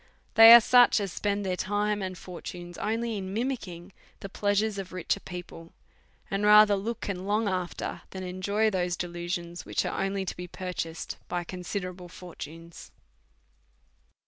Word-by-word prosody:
They 225 0 +10
are 235 - +12
such 245 0 +5
as 195 -3 -4
spend 205 -1 -1
their 185 -1 0
time 205 +2 -1
and 185 -1 -4
fortunes 175 0 -9
merely 225 +2 -2
in 190 -1 -6
mimick 250 0 -2
ing 175 +2 -10 0.3
the 195 - -7
pleasures 205 +1 0
of 190 -1 -7
richer 185 +2 -1
people; 175 -3 -9 0.6
and 195 +1 -1
rather 210 0 +7
look 225 +4 -4
and 190 -1 -4
long 210 +1 +1
after 185 -2 -3
than 190 -1 -7
enjoy 200 +4 0
those 180 -2 -1
delusions, 175 0 -4
which - - -1
are - - -2
only 195 0 -2
to - - -4
be 180 0 -7
purchased 175 -2 -5
by 175 0 -2
considerable 180 0 -6
fortunes. 165 -1 -10
190 Hz, 155 wpm, -28 LUFS, 180-205 Hz, 0.6 s, are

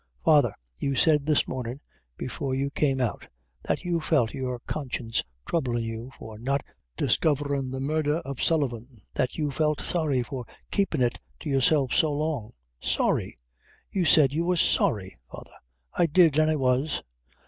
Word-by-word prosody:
"Father, - - +5 0.3
you 140 - -1
said 150 0 +3
this 150 -2 +3
mornin', 125 0 -4 0.4
before 135 -2 -3
you 140 +1 -1
came 135 -3 +1
out, 125 -4 -2 0.3
that - - -2
you 175 -1 0
felt 145 -8 +1
your 130 -2 -3
conscience 125 -6 -2 0.2
troublin' 125 -8 0
you 115 +3 -5
for 110 -1 -10
not 135 +4 0 0.3
discoverin' 140 -3 +1
the 130 +1 -4
murdher 150 +2 0
of 140 -1 -5
Sullivan; 125 -7 -1
that 130 - -1
you 150 -3 -1
felt 150 +1 +1
sorry 150 -7 0
for 130 0 -6 0.3
keepin' 180 -10 +1
it 120 - 0 0.2
to - - -3
yourself 135 0 +3
so 155 - +3
long 145 -6 -2 0.3
sorry! - - 0 0.6
you 190 - +1
said 145 -4 +5
you 165 +3 0
were 180 +1 +1
sorry, 100 - +2 0.2
father!" - - -10 0.4
"I 175 - +3
did, 165 -2 +5
and 155 0 +4
I 155 - +2
was." 135 +2 +1
140 Hz, 160 wpm, -27 LUFS, 125-155 Hz, 0.6 s, Father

